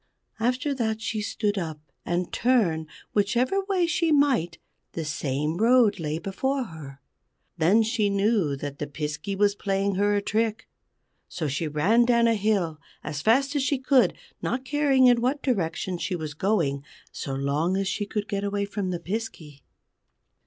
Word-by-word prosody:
After 255 +5 0
that 220 -4 -1
she 220 -1 -3
stood 205 -1 -1
up; 160 -4 -5 0.3
and 175 +1 -1
turn 195 -11 +2 0.3
whichever 245 - +1
way 380 -3 +1
she 335 -1 +1
might 260 - +2 0.4
the 165 - -4
same 150 +1 -2
road 225 -2 +4
lay 155 -1 -2
before 260 +10 -2
her. 150 - -10 0.6
Then 195 +8 +4
she 220 -2 +1
knew 200 -6 +1
that 140 0 -6
the 150 - -3
Piskey 150 +6 -4
was 205 +1 +3
playing 195 0 -1
her 205 0 +3
a 205 - +1
trick. 220 +1 -1 0.6
So 160 -3 -3
she 145 +4 -2
ran 190 +11 +3
down 235 -1 +3
a 230 - +4
hill 195 -8 0 0.2
as 150 -1 -4
fast 270 - +2
as 285 - +2
she 270 +1 +1
could, 255 -6 +3 0.3
not 255 +2 -2
caring 275 -2 +3
in 245 -2 +5
what 265 +4 0
direction 180 - -1
she 185 - -2
was 155 -3 -5
going, 155 -6 0 0.3
so 135 - -5
long 145 +7 0
as 195 0 -1
she 205 +1 -2
could 210 0 -3
get 200 0 -2
away 200 0 -1
from 200 -2 -3
the 175 -2 -2
Piskey. 170 -7 -6
200 Hz, 165 wpm, -26 LUFS, 160-235 Hz, 0.6 s, in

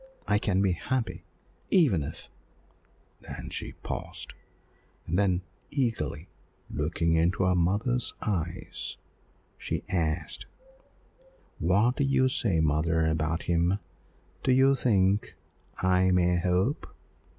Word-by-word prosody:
I 105 0 +3
can 100 -2 +1
be 95 - +3
happy, 120 +7 -2 0.4
even 140 - +4
if 75 +2 -7 0.5
" - - -36
There - - -8
she - - -4
paused, - - -5 0.7
and 85 +3 0
then 95 -2 +2 0.3
eagerly 105 - -1 0.4
looking 80 +2 0
into 85 +3 +2
her 90 0 +3
mother's 105 +8 +1
eyes 85 -6 -3 0.6
she - - -3
asked, 85 -2 -1 1.1
"What 105 +9 +3
do - - +2
you 130 -1 +3
say, 115 - +1
mother, 80 +1 +2
about 80 +1 0
him? 85 +2 +2 0.6
do - - +2
you 135 +2 +5
think 100 -6 +2 0.5
I 95 0 +4
may 90 -1 +3
hope?" 90 - +1
90 Hz, 115 wpm, -28 LUFS, 85-115 Hz, 1.1 s, you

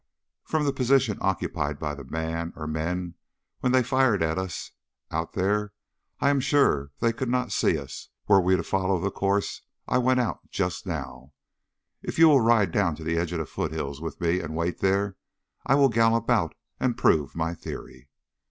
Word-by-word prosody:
"From 155 -1 0
the 140 - +1
position 130 -4 +2
occupied 80 -6 -1
by 75 0 -3
the 70 -1 -8
man 80 +4 -3
or 75 - -6
men 85 +3 -3 0.5
when 125 - +1
they 130 0 +4
fired 125 -6 +2
at 80 +2 0
us 95 -1 -5 0.4
out 80 +1 -3
there, 105 +2 0 0.5
I 140 - +3
am 140 - +2
sure 135 - +2
they 115 0 +2
could 125 +2 -3
not 125 -3 0
see 85 - +2
us 70 -2 -8 0.2
were 100 -2 +6
we 95 +1 +3
to 85 - -1
follow 95 0 0
the 100 +3 -1
course 100 +1 -1 0.3
I 125 - +2
went 130 +1 +3
out 120 -4 0
on - - -33
just - - -2
now. 65 +3 -6 0.7
If - - -5
you 165 0 +8
will 140 -4 +6
ride 110 -5 +4
down 85 -4 +1
to 80 - -10
the 85 +1 -1
edge 85 0 -2
of 90 - -2
the 80 - -2
foothills 75 -1 -4
with 80 - -6
me 85 +1 +1
and 80 -3 -5
wait 85 +2 -2
there, 100 0 +1 0.5
I 135 - +5
will 140 -1 +5
gallop 115 0 +2
out 100 -10 +1 0.2
and 125 -2 0
prove 75 -3 +2
my 85 0 -1
theory." 65 -5 -9
95 Hz, 195 wpm, -26 LUFS, 80-120 Hz, 0.7 s, you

